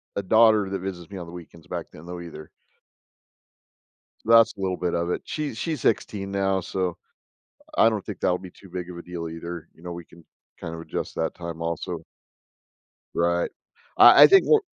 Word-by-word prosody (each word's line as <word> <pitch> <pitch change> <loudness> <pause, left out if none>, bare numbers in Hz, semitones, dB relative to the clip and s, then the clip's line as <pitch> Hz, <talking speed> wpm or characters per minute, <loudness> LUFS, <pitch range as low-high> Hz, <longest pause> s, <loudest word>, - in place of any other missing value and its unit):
a 100 - -2
daughter 110 0 +5
that 95 0 -3
visits 90 -3 -6
me 100 - -6
on 85 -2 -7
the - - -10
weekends 85 -2 -12
back - - -5
then, 75 - -13
though, 90 0 -7
either. 80 -3 -10 1.8
That's 115 0 +6
a - - -8
little 95 -1 -1
bit 90 -1 -2
of 85 0 -1
it, - - -1
she's 150 -7 -4
she's 155 +1 -3
16 100 -2 0
now, 95 -1 +1
so, 90 -1 -2 0.8
I 115 - +6
don't 110 -4 -3
think 105 -5 -7
that'll 90 - +1
be 90 -1 -10
too 95 - -17
big 90 0 -6
of 90 - -8
a - - -7
deal 85 -1 -6
either, 85 0 -7
you - - -22
know, 90 - -6
we 85 0 -8
can 85 0 -18 0.4
kind 80 - -6
of 80 - -7
adjust - - -5
that 80 - -2
time, 85 -1 -7
also. 85 0 -4 1.1
Right. 85 0 +1 0.5
I - - +10
I - - +11
think, 390 0 +6
onc 450 - +6
90 Hz, 200 wpm, -25 LUFS, 85-100 Hz, 1.8 s, I